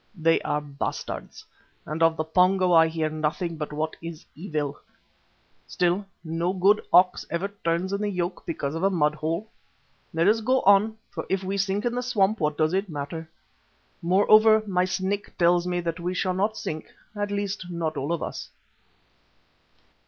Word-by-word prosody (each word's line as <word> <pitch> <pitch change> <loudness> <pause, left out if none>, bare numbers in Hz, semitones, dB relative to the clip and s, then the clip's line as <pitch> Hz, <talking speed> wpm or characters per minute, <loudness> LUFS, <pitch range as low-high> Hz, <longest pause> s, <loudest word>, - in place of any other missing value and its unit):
They 165 0 +3
are 150 - -1
bastards, 140 -1 -5 0.4
and 155 +3 -5
of 165 0 +4
the 155 - 0
Pongo 180 +2 +3
I 165 -1 +7
hear 160 -1 -1
nothing 155 +2 -2
but 150 -1 -5
what 155 +1 -3
is 165 -1 -8
evil. 150 -4 -4 0.9
Still, 180 +3 0 0.2
no 165 +2 -1
good 195 +3 +4
ox 180 +1 +5
ever 175 +4 -2
turns 170 +3 0
in 200 - -1
the 210 - 0
yoke 180 -1 -3
because 145 -4 -3
of 165 - -3
a 195 - +3
mud 150 -5 +2
hole. 160 +7 -3 0.6
Let 165 +2 +1
us 220 +2 +4
go 255 +4 +2
on, 205 +3 +4
for - - -6
if 190 0 0
we 190 +1 -2
sink 200 +2 -1
in 240 - 0
the 245 - -1
swamp 220 -4 +1
what 150 -2 0
does 155 +1 +2
it 195 +1 0
matter? 160 +2 -5 0.7
Moreover, 215 +5 +5
my 180 -3 +1
Snake 190 +2 -3
tells 175 0 +3
me 175 0 -1
that 170 0 -3
we 180 +2 -3
shall 185 0 0
not 205 +4 0
sink, 155 0 -5 0.3
at 205 0 -2
least 200 -2 -3
not 170 -2 -2
all 140 +4 -2
of 170 - -1
us." - - -6
180 Hz, 175 wpm, -25 LUFS, 160-195 Hz, 0.9 s, I